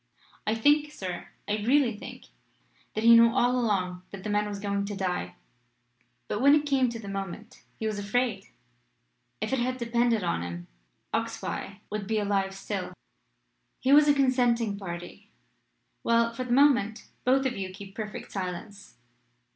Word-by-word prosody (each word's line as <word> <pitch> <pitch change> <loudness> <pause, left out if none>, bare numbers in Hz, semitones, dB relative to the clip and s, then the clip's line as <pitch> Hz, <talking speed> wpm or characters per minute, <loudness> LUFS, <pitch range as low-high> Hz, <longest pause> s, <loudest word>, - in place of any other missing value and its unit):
I 215 - +2
think, 295 +6 +3
sir 185 -10 -6 0.2
I 210 - 0
really 240 +2 +3
think 210 - -10 0.7
that 215 - -1
he 235 0 +8
knew 230 0 +8
all 245 0 +2
along 190 -7 0
that 195 -2 -9
the 210 - -3
man 210 0 +1
was 205 -1 -5
going 200 0 -1
to 205 0 -4
die, 180 - -2 0.9
but 210 - -2
when 280 +2 +7
it 300 0 +1
came 270 -3 +2
to 235 - -5
the 220 -3 -9
moment, 195 +3 -6 0.2
he 220 - -4
was 215 -1 -1
afraid. 210 -1 -1 0.9
If - - -2
it 265 - +2
had 255 +1 -1
depended 235 -2 +1
on 170 - 0
him, 85 0 -6 0.5
Oxbye 200 +1 -3
would 210 -2 -3
be 220 0 0
alive 200 -2 0
still." 195 -2 -4 0.9
"He 265 +2 +3
was 295 +1 +7
a 290 - +5
consenting 245 -5 +2
party. 175 -3 -8 0.7
Well; 230 0 +3
for 255 +2 -4
the 245 - -5
moment 255 -5 +3 0.2
both 265 +2 +3
of 255 -2 0
you 190 -1 -4
keep 195 +1 -11
perfect 210 0 -6
silence. 195 +2 -6
215 Hz, 165 wpm, -28 LUFS, 195-245 Hz, 0.9 s, he